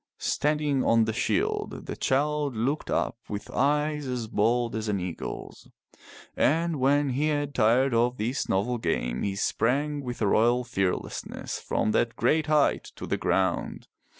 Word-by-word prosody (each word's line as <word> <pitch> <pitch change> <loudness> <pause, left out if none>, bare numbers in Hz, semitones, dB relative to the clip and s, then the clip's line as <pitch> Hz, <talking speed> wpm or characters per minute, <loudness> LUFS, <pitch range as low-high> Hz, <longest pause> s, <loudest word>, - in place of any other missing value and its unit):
Standing 150 -2 0
on 115 -1 +4
the 110 - -2
shield, - - -1
the - - -5
child 145 0 0
looked 135 +7 -1
up 115 - -1
with 105 0 -5
eyes 150 +1 +1
as 125 -2 -2
bold 115 +2 +1
as 110 0 -3
an 100 -2 0
eagle's, 90 -2 -6 0.7
and 165 +1 +2
when 140 +2 +3
he 140 +4 0
had 145 -2 -1
tired 125 +3 +3
of 120 +2 +2
this 120 +6 -2
novel 120 +6 0
game, 60 - -1
he 100 -1 -1
sprang 145 +8 0
with 125 -1 -5
a - - +1
royal 120 +3 +3
fearlessness 95 -6 -3
from 110 - -1
that 115 +1 +1
great 155 +5 +2
height 150 -2 +2
to - - -7
the - - -1
ground. 95 -2 -1
125 Hz, 155 wpm, -27 LUFS, 110-145 Hz, 0.7 s, on